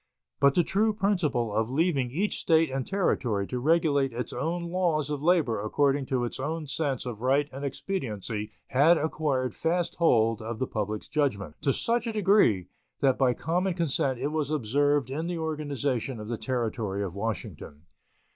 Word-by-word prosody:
But 140 0 +4
the 175 - +4
true 215 +5 +1
principle 165 - 0
of 110 +2 0
leaving 140 -2 +1
each 185 +11 -1
State 160 -3 +3
and 135 -1 -3
Territory 120 - 0
to 125 +5 -4
regulate 145 -2 +2
its 120 +1 -4
own 170 +3 -2
laws 165 -5 0
of 145 -2 -3
labor 155 - +2
according 135 +5 +1
to 125 -2 0
its 120 - -6
own 155 +3 -3
sense 140 -3 -2
of 115 -3 -6
right 135 +3 +2
and 135 +2 -6
expediency 115 - -3 0.2
had 155 +6 +5
acquired 145 -5 -1
fast 170 +1 -1
hold 115 -8 +3
of 115 +1 -5
the 130 - -1
public 105 -2 -3
judgment, 100 - -1
to 140 - +2
such 235 - 0
a 225 - -2
degree 195 - +3 0.4
that 135 -2 +3
by 125 -3 +3
common 180 +2 -1
consent 140 -6 0
it 145 - -2
was 155 -3 -1
observed 145 0 +1
in 160 +5 -2
the 175 -1 -2
organization 145 -6 -2
of 105 +1 -7
the 120 - -1
Territory 110 -4 -2
of 95 -4 -4
Washington. 100 -7 -5
140 Hz, 175 wpm, -27 LUFS, 120-160 Hz, 0.4 s, had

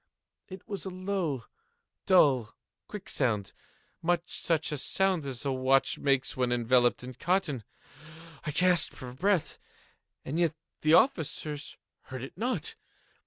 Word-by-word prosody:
It 190 -1 -10
was 200 -5 -5
a - - -4
low, 185 -8 -2 0.6
dull, 135 - +4 0.3
quick 205 -2 -8
sound—much 145 - -2
such 160 -3 0
a 150 - -3
sound 185 -2 +1
as 130 +1 -5
a 140 - +1
watch 130 +1 +2
makes 135 -1 +1
when 125 -1 0
enveloped 120 +1 +3
in 130 +1 -7
cotton. 165 - 0 0.8
I 160 - -3
gasped 175 0 +3
for 125 -1 -8
breath—and 165 -2 -3
yet 165 -3 +2 0.3
the 155 +1 +5
officers 155 - +1 0.3
heard 130 -1 -7
it 135 - -8
not. 245 +6 -2
150 Hz, 125 wpm, -29 LUFS, 130-180 Hz, 0.8 s, the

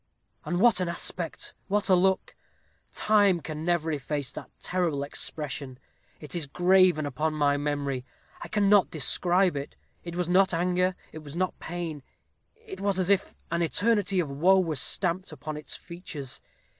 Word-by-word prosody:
And 175 - -1
what 230 -2 +5
an 180 -2 -1
aspect, 170 0 -3
what 205 +1 0
a 190 - +5
look! 190 +1 +2 0.6
Time 205 -4 +3
can 155 0 -6
never 170 -2 +1
efface 145 -1 -3
that - - -9
terrible 170 -6 -1
expression; 140 -2 -5 0.4
it 150 - -7
is 170 -5 -2
graven 180 0 +4
upon 155 +2 -1
my 145 -1 +3
memory 145 -3 -2 0.4
I - - -6
cannot 205 -1 +4
describe 175 +3 +2
it. 140 0 -5 0.3
It 170 0 -6
was 175 -1 -1
not 185 0 +4
anger 180 +2 +1 0.2
it 155 - -8
was 150 -1 -10
not 185 +1 -1
pain: 165 -3 -5 0.5
it 450 -4 -10
was 200 -1 +1
as 185 +1 +2
if 195 -1 +1 0.2
an 170 0 0
eternity 200 +2 +2
of 170 - 0
woe 175 +8 +4
were 165 -4 0
stamped 180 +6 0
upon 155 0 -6
its 150 - -6
features. 165 -6 -8
175 Hz, 160 wpm, -27 LUFS, 150-185 Hz, 0.6 s, what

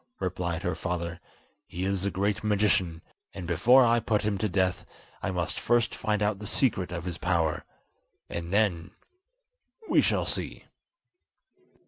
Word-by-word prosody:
replied 85 -2 -2
her 90 - 0
father, 85 0 -3 0.5
"he 90 +2 -4
is 95 -1 0
a 100 - +1
great 100 +2 -1
magician, 100 -6 +1 0.3
and 95 -3 -6
before 120 +10 +5
I 120 0 +4
put 105 -2 0
him 105 -2 0
to 110 - 0
death, 95 0 +1 0.4
I - - -1
must 90 -2 -2
first 120 -1 +2
find 105 -1 -1
out 105 -1 0
the 105 - -7
secret 95 -9 +1
of 85 -1 -4
his 90 -2 -5
power, 85 -4 0 0.6
and 85 0 -5
then—we 365 - -2
shall - - +1
see." - - -4
95 Hz, 145 wpm, -28 LUFS, 85-110 Hz, 0.6 s, before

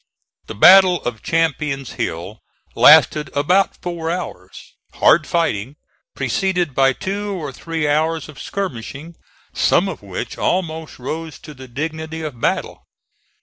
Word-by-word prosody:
The 110 - -7
battle 185 - +7
of 120 -2 -4
Champion's 150 -5 -1
Hill 105 -1 -5 0.3
lasted 150 -3 +6
about 180 +7 +2
four 170 -2 -4
hours, 165 - -7 0.2
hard 155 -3 +4
fighting, 135 -7 -1 0.4
preceded 180 -6 -1
by 135 +1 +4
two 200 +4 -4
or 150 -6 -5
three 160 +3 -3
hours 160 +2 0
of 155 - -11
skirmishing, 160 - -6 0.4
some - - +2
of - - -6
which - - -6
almost 160 -3 -2
rose 155 +3 -6
to 150 - -11
the 130 -1 -12
dignity 160 +4 -5
of 135 -7 -7
battle. - - -2
155 Hz, 130 wpm, -19 LUFS, 135-170 Hz, 0.4 s, battle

